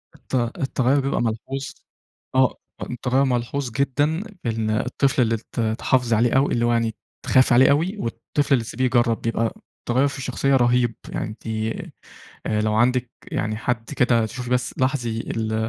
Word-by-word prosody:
الت - - -6 0.2
التغيُّر 135 0 +1
بيبقى 135 0 0
ملحوظ، 120 +4 -3 0.7
آه، 130 -1 +4 0.3
آه، - - -2
التغيُّر 125 +2 +1
ملحوظ 125 +1 -1
جدًا 145 - 0 0.2
إن 110 -1 -1
الطفل 130 +5 +1
اللي 115 -1 +2
ات 115 +2 -8
اتحافظ 115 +2 +1
عليه 115 +2 +3
أوي، 135 +2 +3
اللي 120 0 +1
هو 120 - +2
يعني 115 -2 0 0.3
اتخاف 130 -1 +4
عليه 130 +3 +6
أوي، 170 +9 +1
والطفل 135 - -1
اللي 120 -4 +3
تسيبيه 130 +3 -2
يجرّب 120 -2 +2
بيبقى 115 0 0 0.3
تغيُّر 130 +4 +2
في 140 - -5
الشخصية 135 +1 0
رهيب، 120 -2 +3
يعني - - -3
أنتِ 110 +2 -10 1.0
آآ، 105 0 0
لو 110 0 +1
عَندِك 125 +2 +2 0.2
يعني 110 0 -1
حد 115 0 -2
كده 120 -4 +3
تشوفي 125 +2 -6
بس 125 0 0
لاحظي 125 -4 0
ال 110 -1 -3
125 Hz, 165 wpm, -23 LUFS, 115-135 Hz, 1.0 s, عليه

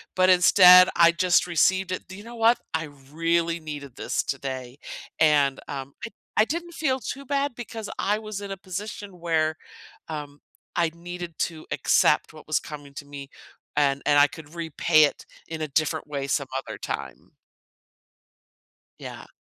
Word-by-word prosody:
but 185 0 +4
instead, 180 0 +8
I 170 0 +6
just 175 +1 +3
received 185 +2 +2
it. 185 - -4
"Do 190 - -10
you 205 - -11
know 235 +1 -10
what? 230 +1 +4
I 160 - -1 0.3
really 165 +1 0
needed 145 -5 -8
this - - -1
today." 130 -2 -5 0.4
And, 145 -3 +3
um, 135 -1 -6
I - - -6 0.3
I 215 - +5
didn't 340 +6 -4
feel 265 -5 0
too 275 +4 -6
bad 280 -1 -1
because 225 -3 -7
I 210 +2 +1
was 215 -2 -6
in 200 - -6
a 195 - -5
position 195 0 -7
where, 160 -2 0 0.5
um, 145 -2 -7 0.3
I 170 -1 +2
needed 175 -1 -8
to 160 -2 -3
accept - - +2
what 155 -1 -14
was 155 - +1
coming 145 -2 -10
to 145 - -8
me, 140 -1 -9 0.5
and 140 -1 +2
and 145 -1 +4
I 145 - +7
could 160 +1 -12
repay 160 -1 +3
it 145 - 0 0.2
in 160 -1 -6
a 155 - -1
different 155 +2 -1
way 140 -2 -3
some - - 0
other - - -6
time. - - -6 1.7
Yeah. - - -9
170 Hz, 165 wpm, -25 LUFS, 150-190 Hz, 1.7 s, instead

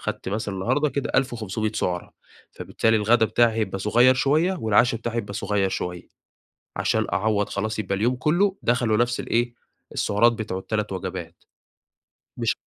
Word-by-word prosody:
أخدت - - -4
مثلًا 105 0 -3
النهاردة 130 +10 +1
كده 140 -1 -3
1500 110 -4 -1
سُعرة، 90 -4 -2 0.4
فبالتالي 110 0 0
الغدا 110 +2 +3
بتاعي 120 +1 +3
هيبقى 95 -3 -1
صغير 120 +6 +4
شوية، 150 +7 +2
والعشاء 115 +2 +3
بتاعي 120 0 -4
هيبقى 100 -3 -3
صغير 100 -1 0
شوية. 90 -2 -5 0.7
عشان - - +1
أعوّض 105 0 +1
خلاص 110 +2 -3
يبقى 100 -2 -1
اليوم 115 +6 +1
كله 180 +9 +1
دخله 120 -2 +2
نفس 120 +1 +1
ال - - -7
إيه، 120 +1 0 0.4
السُعرات 115 +4 +3
بتوع 110 -5 -4
ال3 105 +1 -3
وجبات. 95 -2 -6 1.0
مش - - 0
110 Hz, 150 wpm, -24 LUFS, 100-120 Hz, 1.0 s, صغير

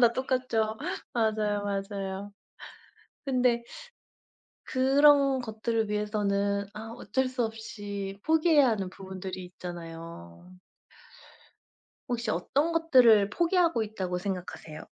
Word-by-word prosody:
다 235 -1 +6
똑같죠. 250 -4 0 0.4
맞아요, 215 -3 0
맞아요. 195 0 -4 0.9
근데 250 -3 +2 1.0
그런 275 0 +4
것들을 220 -1 -2
위해서는 200 -1 0
아 225 +1 -7
어쩔 260 +6 -1
수 255 -1 -1
없이 205 -3 -5
포기해야 315 -4 +4
하는 200 -4 -1
부분들이 190 -1 -7
있잖아요. 165 - -9 1.5
혹시 235 -3 -1
어떤 280 - 0
것들을 250 -11 +5
포기하고 335 - +2
있다고 190 -4 -3
생각하세요? 180 -4 -6
215 Hz, 240 characters per minute, -28 LUFS, 195-255 Hz, 1.5 s, 다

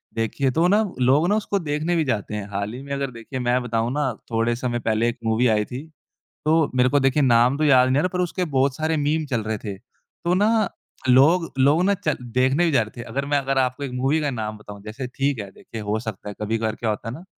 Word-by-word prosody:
देखिए 115 +4 0
तो 165 +6 +2
ना 205 +4 +4 0.2
लोग 135 +6 +4
ना 205 - +3
उसको 205 -2 -1
देखने 155 +1 -1
भी 165 - +2
जाते 105 -4 -2
हैं, 105 -1 -4
हाल 100 +2 -3
ही 130 - -7
में 140 - -10
अगर 140 -1 -2
देखिए 120 +3 -7
मैं 125 +1 +1
बताऊँ 115 0 -1
ना 145 -2 0 0.2
थोड़े 115 +1 +1
समय 120 -1 -2
पहले 115 0 +1
एक 120 - -5
मूवी 110 +3 +2
आई 105 -2 +2
थी, 125 +6 -7 0.6
तो 160 0 +3
मेरे 125 0 +4
को 145 - +3
देखिए 135 +2 +2
नाम 125 +1 +4
तो 155 - +1
याद 130 -3 +5
नहीं 130 +2 +2
आ - - +3
रहा 185 - +1
पर 180 - -1
उसके 180 +1 -1
बहुत 135 -3 +1
सारे 160 +1 0
मीम 155 +2 0
चल 120 -5 -1
रहे 110 0 -3
थे, 100 -2 -6
तो 170 - -5
ना 215 +2 +3 0.4
लोग 155 +7 +5
लोगो 145 +6 +4
ना 200 +2 +3
चल 200 +1 -1 0.2
देखने 130 +6 +3
भी - - +2
जा 130 -5 +4
रहे 110 +3 -9
थे। - - -6
अगर 140 +1 -3
मैं 145 0 +2
अगर 135 0 0
आपको 130 +2 0
एक 135 - -5
मूवी 135 +5 +1
का 145 -2 0
नाम 110 -4 -4
बताऊँ 105 -1 -11
जैसे 110 +5 -6
ठीक 135 +1 -1
है, 100 -1 -7
देखिए 110 +3 -10
हो 105 +1 -1
सकता 110 -3 -6
है 105 - -6
कभी-कभार 110 +1 -1
क्या 115 - -1
होता 105 +1 -4
है 115 - -4
ना, 165 - -10
130 Hz, 260 wpm, -23 LUFS, 115-150 Hz, 0.6 s, याद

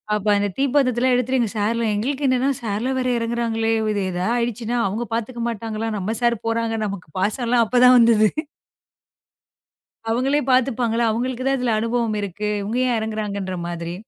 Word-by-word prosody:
அப்ப 210 0 -3
அந்த 205 0 +1
தீப்பந்தத்தேல்ல 260 -2 +2
எடுத்துட்டு 250 -2 +1
சார்லாம், 220 +1 0
எங்களுக்கு 275 +7 -2
என்னன்னா 255 +1 +2
சார்லாம் 235 +4 -2
வேற 255 - -1
எறங்குறாங்களே! 230 -1 -1 0.2
இது 205 - -1
ஏதா 180 +1 -2
ஆயிடுச்சுன்னா 235 0 -2
அவங்க 220 +5 -3
பாத்துக்க 235 +1 -3
மாட்டாங்களா, 225 0 -4
நம்ம 205 +3 -2
சார் 235 -1 +2
போறாங்க, 230 0 0
நமக்குப் 190 -5 -7
பாசோல 235 +5 +1
அப்பதான் 250 +2 +6
வந்தது. 225 -2 +5 1.8
அவங்களே 260 +5 +1
பாத்துப்பாங்களா 245 -2 +2
அவங்களுக்கு 245 +3 -2
தான் 270 0 +2
இதுல 245 -3 0
அனுபவம் 230 -1 -1
இருக்கு. 200 +1 -4
இவங்க 210 +4 -3
ஏன் 250 -2 +1
இறங்குகிறாங்கன்ற 205 -3 -3
மாதிரி. 170 0 -5
230 Hz, 145 wpm, -21 LUFS, 215-245 Hz, 1.8 s, அப்பதான்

